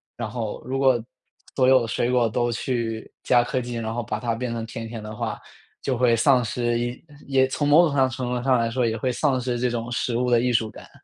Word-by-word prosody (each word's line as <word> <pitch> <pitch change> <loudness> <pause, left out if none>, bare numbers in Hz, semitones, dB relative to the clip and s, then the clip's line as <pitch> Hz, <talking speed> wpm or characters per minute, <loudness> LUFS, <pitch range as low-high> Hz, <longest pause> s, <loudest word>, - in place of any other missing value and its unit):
然 115 -2 -4
后 110 -2 -4
如 135 +1 -2
果 130 -3 +4 0.5
所 130 -2 +3
有 130 0 +6
的 115 - -3
水 120 +2 0
果 120 -2 +3
都 120 +2 0
去 115 -2 -3
加 120 - +4
科 125 +1 -1
技， 120 0 -5
然 115 -1 -3
后 120 - -2
把 110 -1 -3
它 115 0 -1
变 120 0 -3
成 115 -1 -4
甜 115 0 -6
甜 115 -1 -7
的 105 0 -7
话， - - -3 0.4
就 130 -3 -1
会 120 -2 +4
丧 125 +2 +4
失 120 0 -1 0.5
也 135 -1 +4
从 145 +2 -1
某 155 +4 +7
种 150 - -1
上 130 -2 +3
程 125 -1 -3
度 125 - -1
上 130 0 +3
来 115 -1 +1
说 125 0 +1
也 110 - 0
会 125 +2 -1
丧 135 0 +1
失 120 -1 -2
这 125 - +1
种 120 0 -4
食 120 0 -1
物 125 +1 0
的 120 - +5
艺 125 +1 +1
术 110 -2 +1
感。 - - -13
120 Hz, 270 characters per minute, -24 LUFS, 115-130 Hz, 0.5 s, 某